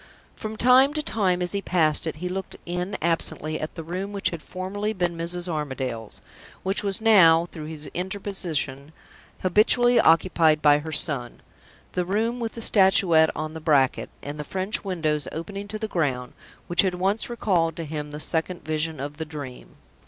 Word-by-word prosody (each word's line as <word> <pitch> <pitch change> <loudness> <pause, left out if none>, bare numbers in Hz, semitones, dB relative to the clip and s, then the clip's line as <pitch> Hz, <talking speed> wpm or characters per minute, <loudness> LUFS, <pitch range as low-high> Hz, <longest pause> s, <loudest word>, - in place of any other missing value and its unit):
From 215 -1 -6
time 260 +5 +5
to 305 - +2
time, 185 -7 0
as 175 - -1
he 200 - -1
passed 165 -4 +1
it, 160 - -3
he 175 +4 -5
looked 190 +1 -5
in 180 +3 -3
absently 160 -2 -1
at 155 - -6
the 165 - -6
room 185 +5 -5
which 200 - 0
had 170 -3 -6
formerly 200 +5 -4
been 175 -3 -1
Mrs. 175 +2 +1
Armadale's, 130 -8 -4 0.4
which 195 +1 0
was 200 -2 0
now 170 -7 +6
(through 155 -2 -8
his 155 -1 -6
interposition) 175 -7 -2 0.5
habitually 240 +6 +4
occupied 165 -2 +4
by 145 -1 +5
her 160 +2 -7
son 135 -6 0 0.5
the 180 - -1
room 220 +6 -1
with 230 -1 -3
the 230 - -5
Statuette 190 -6 +5
on 155 +1 -4
the 160 - -8
bracket, 140 -4 +2
and 145 +1 -6
the - - -3
French 190 +6 -3
windows 155 -7 -1
opening 200 +5 -6
to 215 - -5
the 220 0 -4
ground, 135 - -2 0.3
which 175 - +4
had 185 -2 0
once 195 +6 0
recalled 180 -8 0
to 165 - -5
him 150 -1 -5
the 150 0 -7
Second 165 +2 -2
Vision 155 0 -2
of 145 +2 -6
the 160 - -4
Dream. 145 -5 -9
170 Hz, 180 wpm, -24 LUFS, 155-195 Hz, 0.5 s, now